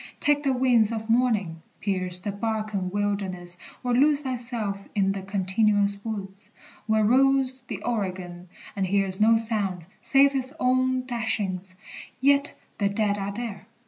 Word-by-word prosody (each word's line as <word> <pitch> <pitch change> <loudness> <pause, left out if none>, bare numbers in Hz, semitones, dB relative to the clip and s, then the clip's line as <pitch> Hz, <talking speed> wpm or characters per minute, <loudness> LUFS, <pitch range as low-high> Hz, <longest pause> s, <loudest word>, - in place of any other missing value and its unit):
Take 290 0 +2
the 275 -2 +1
wings 245 -4 +3
Of 220 0 -3
morning, 215 -9 +1 0.2
pierce 185 -3 -2
the 205 - -3
Barcan 215 -2 -2
wilderness, 190 -3 -2 0.2
Or 245 -1 0
lose 285 +3 +4
thyself 240 -6 -1 0.2
in 195 -2 +2
the 195 0 -4
continuous 200 +1 +1
woods 200 -3 -6 0.4
Where 220 0 +3
rolls 265 +2 +3
the - - -6
Oregon, 185 -6 -4 0.3
and 195 -2 0
hears 195 0 0
no 225 +1 +6
sound 210 -6 0 0.2
Save 275 0 +5
his 270 +1 0
own 255 0 +2
dashings, 200 -6 -2 0.4
yet 280 +1 +3 0.2
the 200 -1 +2
dead 205 0 0
are 200 0 -3
there! 220 -2 -6
215 Hz, 145 wpm, -26 LUFS, 195-250 Hz, 0.4 s, no